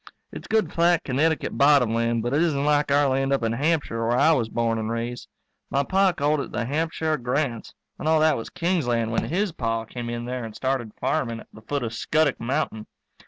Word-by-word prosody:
It's - - -9
good 220 -1 +1
flat 170 0 +3
Connecticut 155 +4 0
bottom 140 -5 +5
land, 115 0 0
but 120 +2 -2
it 145 - +3
isn't 145 -5 +1
like 150 -1 +2
our 145 0 +4
land 135 +1 0
up 135 -3 +1
in 115 - +1
Hampshire 140 -5 0
where 120 +1 +2
I 150 +5 +5
was 120 -8 +1
born 115 0 0
and 110 0 -3
raised. 115 +1 -4 0.4
My 140 +1 +1
Pa 190 +4 +3
called 150 -2 0
it - - -5
the 120 - -2
Hampshire 160 +3 -1
Grants 125 -1 -2 0.2
and - - -3
all 160 0 +4
that 155 0 +4
was 115 - -5
King's 170 -5 -1
land 115 -2 0
when 115 - 0
his 190 +3 -1
Pa 115 -6 -2
came 120 +1 -6
in 120 0 -4
there 125 0 -4
and 110 -2 -8
started 130 -5 -2
farming 125 -4 -1
at - - -17
the 110 - -13
foot 140 +4 -3
of 115 -1 -4
Scuttock 155 +4 +1
Mountain. 115 -4 -2
135 Hz, 220 wpm, -24 LUFS, 115-155 Hz, 0.4 s, bottom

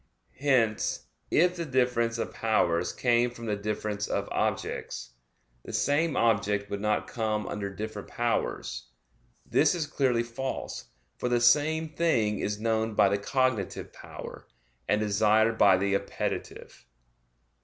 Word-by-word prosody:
Hence 125 -6 +1 0.2
if 180 +2 +3
the 170 - -3
difference 125 -4 +1
of 115 - -3
powers 90 -6 +1
came 120 -1 +2
from 120 -1 -10
the 105 -2 0
difference 105 0 -3
of - - -2
objects, - - -2 0.5
the - - -9
same 150 +2 +1
object 105 -3 +1
would 100 0 -3
not 105 0 +1
come 110 -2 -2
under 100 -1 -3
different 105 +1 -6
powers. - - -2 0.6
This - - +3
is 165 -3 -1
clearly 130 -5 +1
false; 125 +3 -5 0.3
for 125 - -1
the 120 0 +2
same 155 +6 +3
thing 135 -10 +1
is 105 +1 -2
known 110 0 0
by 100 - +5
the 100 +1 0
cognitive 130 -2 -1
power, - - -10 0.4
and 105 - +2
desired 110 +2 +3
by 95 -3 +6
the 100 +1 0
appetitive. 100 - -4
110 Hz, 135 wpm, -28 LUFS, 105-125 Hz, 0.6 s, by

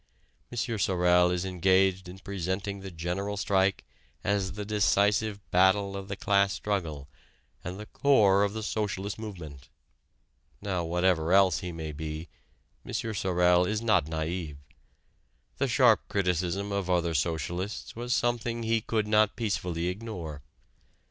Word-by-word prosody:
M. 120 - -7 0.2
Sorel 90 -2 +3
is 90 +1 -1
engaged 95 0 +2
in 90 - -9
presenting 100 +1 -4
the 95 0 -7
General 90 +4 -3
Strike 95 0 +1 0.4
as 100 -2 0
the 105 0 -5
decisive 105 0 +2
battle 95 +2 +3
of 100 -1 -6
the 100 - -4
class 100 0 +2
struggle 85 -9 -3 0.6
and 90 +3 -6
the 105 - -7
core 105 -8 +4
of 100 0 0
the 110 0 -4
socialist 105 -1 -3
movement. 85 -11 -9 0.9
Now 95 -4 -2
whatever 85 0 +1
else 95 -4 +5
he 90 - -5
may 80 -2 -5
be, 75 +2 -6 0.5
M. - - -9
Sorel 90 -4 +2
is 105 +3 -2
not 105 -9 +3
naïve: 80 -1 -4 1.0
the - - +2
sharp - - +5
criticism 95 +1 -1
of 100 -2 -2
other 85 -2 +1
socialists 85 +6 -2
was 120 +1 -5
something 120 -1 0
he 115 0 +1
could 110 -1 -1
not 105 -1 +3
peacefully 90 -7 -2
ignore. 90 -7 -5
95 Hz, 135 wpm, -28 LUFS, 90-105 Hz, 1.0 s, else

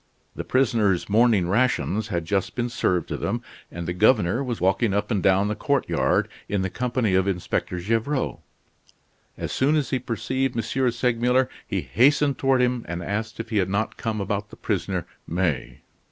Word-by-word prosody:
The - - -4
prisoners' 110 -9 +1
morning 110 -4 +4
rations 110 0 +1
had 85 -5 -2
just 95 +2 -1
been 120 0 -1
served 90 -8 0
to - - -2
them, - - -2 0.3
and 85 -1 -6
the 90 - -1
governor 105 +3 +3
was 120 -4 -3
walking 95 +3 +2
up 105 +4 -1
and 100 -4 +1
down 95 +2 +3
the 105 - 0
courtyard, 140 +4 +1 0.2
in 100 -1 0
the 95 - -2
company 125 -4 0
of 95 +1 +3
Inspector 90 -1 -2
Gevrol. 115 +8 -1 1.0
As - - -4
soon 140 +4 +2
as 145 -5 0
he 130 - +1
perceived 130 +1 -2
M. 115 - 0 0.3
Segmuller 125 +2 +1 0.2
he - - -1
hastened 140 +3 +3
toward 135 -2 +3
him 125 -1 0
and 85 0 -4
asked 110 +5 -3
if 115 - -6
he 110 - +1
had 95 -2 +1
not 100 +3 -1
come 110 -2 -2
about 100 +1 -2
the - - -12
prisoner - - -2 0.2
May. 85 -7 -2
110 Hz, 180 wpm, -24 LUFS, 95-125 Hz, 1.0 s, morning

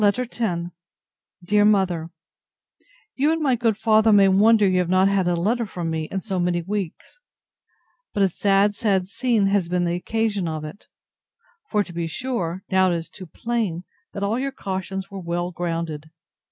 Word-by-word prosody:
LETTER 210 +4 +3
X - - -13 1.0
DEAR 205 +3 +3
MOTHER, 190 -6 +2 1.0
You 290 +4 +2
and 325 - 0
my 285 -4 +2
good 230 -3 +1
father 220 0 +4
may 200 -2 +6
wonder 210 +2 +5
you 185 -1 +2
have 180 -1 0
not 185 +1 +4
had 195 -2 +1
a 175 - +2
letter 220 +7 0
from 170 -4 -4
me 160 -1 -2
in 190 +4 -4
so 190 -3 -3
many 175 -1 0
weeks; 200 - -5 0.9
but 205 - +1
a - - +5
sad, 200 +3 +2
sad 195 -4 0
scene, 230 -1 +1
has 195 -3 +1
been 180 0 +1
the 170 - 0
occasion 205 +1 -1
of 155 -1 -4
it. 155 +7 -11 0.8
For 210 -1 +2
to 180 - -12
be 170 -1 -2
sure, 190 -4 -3
now 190 -1 +4
it - - +1
is 165 -1 -5
too 185 -3 -10
plain, 210 -2 -2 0.3
that 200 - -4
all 215 +4 0
your 275 +1 -2
cautions 190 -3 -5
were 195 - -6
well 175 +1 -2
grounded. 165 -3 -4
195 Hz, 180 wpm, -23 LUFS, 175-215 Hz, 1.0 s, may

